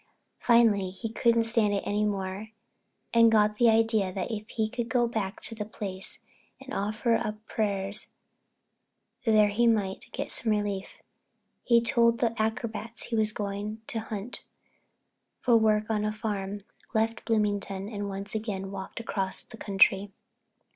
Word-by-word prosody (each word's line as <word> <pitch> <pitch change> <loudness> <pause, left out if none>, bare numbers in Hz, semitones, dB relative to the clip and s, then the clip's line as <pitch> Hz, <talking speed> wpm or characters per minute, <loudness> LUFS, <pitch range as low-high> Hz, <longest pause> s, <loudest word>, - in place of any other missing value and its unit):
Finally 225 -5 +4
he 190 +5 -5
couldn't 230 -1 +3
stand 225 -3 +2
it 200 - -1
any 205 +1 0
more 195 0 -2 0.7
and 230 -1 +6
got 210 -1 +3
the 240 -1 +6
idea 220 -3 +3
that 185 +4 -3
if 215 0 -5
he 220 -1 0
could 235 +1 -4
go 245 -2 +3
back 215 -4 -3
to - - -2
the 220 -2 -4
place 200 -2 -6 0.4
and 270 0 -9
offer 215 +4 0
up 215 -1 -2
prayers 200 -1 -1 1.2
there 215 -2 +5
he 235 +4 +2
might 205 -4 0
get - - -4
some 225 - 0
relief. 205 -2 -3 0.6
He 235 -1 +4
told 235 0 +3
the 235 -2 +1
acrobats 225 0 -3
he 235 - -3
was 215 -1 +2
going 210 +1 -4
to 225 - -2
hunt 220 +1 -6 1.0
for 240 -2 +4
work 215 -1 +3
on 215 -2 0
a 215 - 0
farm, 205 -2 -3 0.3
left 225 +1 +1
Bloomington 205 -3 0
and 205 -2 -4
once 195 +1 -6
again 200 -3 -3
walked 190 +2 -6
across 195 -4 -2
the - - -13
country. 195 -1 +3
215 Hz, 155 wpm, -28 LUFS, 200-225 Hz, 1.2 s, and